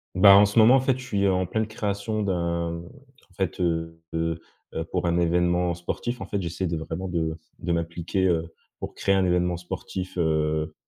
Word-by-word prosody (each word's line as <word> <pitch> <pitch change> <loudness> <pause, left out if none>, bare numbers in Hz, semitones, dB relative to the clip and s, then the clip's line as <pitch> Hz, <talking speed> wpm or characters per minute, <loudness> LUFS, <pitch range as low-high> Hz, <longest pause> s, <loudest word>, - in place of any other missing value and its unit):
Bah, 100 +1 +9
en 100 +1 +8
ce 100 +2 -3
moment, 115 +3 +8
en - - +5
fait, 130 -1 +1
je 130 - -8
suis, 100 -5 0
heu, 95 - +4
en 90 0 +1
pleine 110 +4 -1
création 110 -1 -2
d'un 85 -3 -1
en 135 - -18
fait, 95 -1 -2
heu, 80 -2 -1
de, 80 0 -1 0.3
heu, 80 - -2
pour 90 +2 -2
un 85 0 +2
événement 85 +1 +2
sportif. 120 +7 -4
En - - -3
fait, 100 +1 -2
j'essaie 85 +2 -3
de 85 -1 -2
vraiment 80 +4 -4
de 80 -3 -2 0.2
de 85 - -2
m'appliquer, 85 +2 -1
heu, 85 -2 0 0.3
pour - - -6
créer 100 - +2
un 95 -1 +3
événement 90 -1 +1
sportif, 90 +1 -6
heu 80 -2 0
90 Hz, 205 wpm, -25 LUFS, 85-100 Hz, 0.3 s, Bah